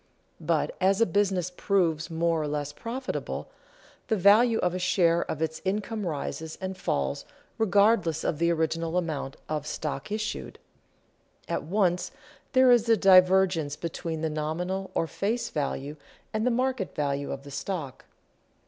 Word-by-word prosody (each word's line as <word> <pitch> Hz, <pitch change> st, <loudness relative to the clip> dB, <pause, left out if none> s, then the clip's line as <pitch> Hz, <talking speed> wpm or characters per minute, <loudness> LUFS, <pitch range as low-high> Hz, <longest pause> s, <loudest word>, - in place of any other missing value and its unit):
But -, -, 0 dB
as 195 Hz, +2 st, +3 dB
a 230 Hz, -, +5 dB
business 185 Hz, -2 st, 0 dB
proves 170 Hz, -6 st, +1 dB
more 165 Hz, 0 st, +1 dB
or 150 Hz, -, -2 dB
less 145 Hz, 0 st, -3 dB
profitable, 255 Hz, -, -5 dB, 0.6 s
the 220 Hz, -, +2 dB
value 215 Hz, +4 st, +5 dB
of 180 Hz, -4 st, 0 dB
a 185 Hz, -, -2 dB
share 170 Hz, -2 st, +3 dB
of 160 Hz, +1 st, -2 dB
its 160 Hz, 0 st, -3 dB
income 210 Hz, +1 st, -2 dB
rises 160 Hz, +1 st, -4 dB
and 190 Hz, 0 st, -4 dB
falls 70 Hz, -, -2 dB, 0.4 s
regardless 200 Hz, -6 st, +3 dB
of 150 Hz, -, -1 dB
the 170 Hz, 0 st, +3 dB
original 165 Hz, +1 st, 0 dB
amount 155 Hz, -6 st, -3 dB
of 150 Hz, -1 st, -3 dB
stock 150 Hz, +3 st, -4 dB
issued. 215 Hz, 0 st, -4 dB, 0.9 s
At -, -, -1 dB
once 180 Hz, 0 st, +1 dB, 0.4 s
there 260 Hz, -1 st, +6 dB
is 235 Hz, -1 st, +4 dB
a 225 Hz, -, +6 dB
divergence 185 Hz, -5 st, +5 dB
between 165 Hz, 0 st, -4 dB
the 160 Hz, -, 0 dB
nominal 180 Hz, +5 st, -3 dB
or -, -, +2 dB
face 215 Hz, +8 st, -2 dB
value 145 Hz, 0 st, -3 dB, 0.4 s
and 215 Hz, +3 st, 0 dB
the -, -, +5 dB
market 250 Hz, -4 st, -1 dB
value 140 Hz, -1 st, -1 dB
of 135 Hz, -, -5 dB
the 140 Hz, -, -11 dB
stock. 150 Hz, -3 st, -5 dB
180 Hz, 150 wpm, -27 LUFS, 155-200 Hz, 0.9 s, there